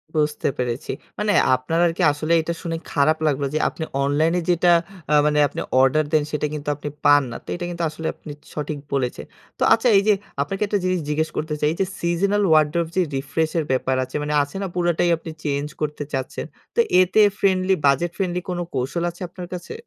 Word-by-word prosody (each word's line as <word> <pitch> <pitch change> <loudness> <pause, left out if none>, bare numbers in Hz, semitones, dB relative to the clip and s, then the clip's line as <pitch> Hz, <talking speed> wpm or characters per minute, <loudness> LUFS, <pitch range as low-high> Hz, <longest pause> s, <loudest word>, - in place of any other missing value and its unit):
বুঝতে 150 -1 +1
পেরেছি। 125 0 -2 0.3
মানে 210 0 +1 0.2
আপনার 130 +6 -2
আরকি 170 +3 -2
আসলেই 155 +3 +1
এইটা 170 +1 -3
শুনে 165 -2 -3
খারাপ 155 +2 +3
লাগলো 140 -1 0
যে, 155 - +1
আপনি 160 - -6 0.2
অনলাইনে 155 +5 +2
যেটা 175 0 +4 0.4
আ - - +4
মানে 150 0 +2
আপনি - - -5 0.2
অর্ডার 150 +4 +3
দেন 155 -1 +4
সেটা 150 0 -1
কিন্তু 150 -1 -4
আপনি 145 0 -6 0.2
পান 145 0 +7
না। - - -6
তো - - -42
এইটা 175 0 -4
কিন্তু 170 -1 -4
আসলে 160 +1 -5
আপনি 155 - -10 0.2
সঠিক 150 0 -4
বলেছেন। 130 -3 -1 0.3
তো - - +1
আচ্ছা 230 +2 +2
এইযে 205 +2 +4 0.3
আপনাকে 195 +8 -3
একটা 205 - +1
জিনিস 185 -1 +1
জিজ্ঞেস 155 +1 0
করতে 155 0 -2
চাই। - - +1
এইযে 190 +3 0
seasonal 195 +4 +1
wardrobe 155 +2 +2
যে - - +5 0.2
রিফ্রেশের 160 +4 -1
ব্যাপার 130 0 +1
আছে, 130 - -9
মানে 150 - -2
আছে 145 +4 -11
না? 195 - -2
পুরোটাই 175 0 +1
আপনি 160 0 -8
চেঞ্জ 145 0 -1
করতে 150 -1 -2
চাচ্ছেন। 130 -1 -3 0.3
তো - - 0 0.2
এতে 185 +4 +3 0.2
ফ্রেন্ডলি 190 -1 +2
বাজেট 140 +5 +3
ফ্রেন্ডলি 180 -2 -1
কোন 180 - -2 0.2
কৌশল 135 +7 -1
আছে 175 +2 -13
আপনার 180 0 -8
কাছে? 180 - -6
160 Hz, 195 wpm, -22 LUFS, 145-175 Hz, 0.4 s, পান